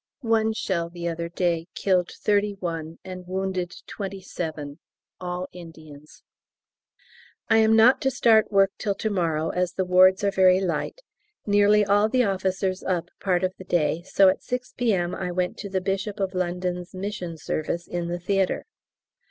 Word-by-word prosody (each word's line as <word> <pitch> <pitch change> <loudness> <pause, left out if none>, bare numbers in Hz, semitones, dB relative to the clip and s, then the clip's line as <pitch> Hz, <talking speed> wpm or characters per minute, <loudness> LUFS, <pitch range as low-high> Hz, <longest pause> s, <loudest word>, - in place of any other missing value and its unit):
One 220 -1 +2
shell 170 -6 -2
the 170 0 -5
other 170 0 -3
day 170 -1 -1
killed 180 -3 +1
thirty 205 0 0
one 165 -2 -4
and 185 -1 -8
wounded 185 -1 -3
twenty 195 -1 -6
seven 155 -5 -6 0.4
all 180 0 -4
Indians. 155 -4 -13 1.3
I 225 - +5
am 220 0 +5
not 230 +4 +6
to 270 - +2
start 230 -4 +3
work 195 -1 +4
till 200 -3 -1
to 220 - -2
morrow, 165 -4 0
as 180 -1 -1
the 190 - -1
wards 185 +2 +5
are 200 - +2
very 185 -1 +5
light; 185 - -2 0.4
nearly 205 0 +4
all 205 +2 +3
the 255 +1 +3
officers 190 -1 -1
up 180 -3 -1
part 185 -2 0
of 185 0 0
the - - -8
day, 170 -2 0
so 190 +2 +4
at 185 - +2
6 250 0 -4
P.M. 190 -8 0
I 180 -1 -3
went 180 0 -1
to 200 - -6
the 190 -1 -1
Bishop 195 +2 -2
of 195 -1 -1
London's 180 0 -3
mission 185 -3 -5
service 155 +2 -3
in 175 -1 -3
the 175 +1 -2
theatre. 195 +1 0
185 Hz, 170 wpm, -25 LUFS, 175-200 Hz, 1.3 s, not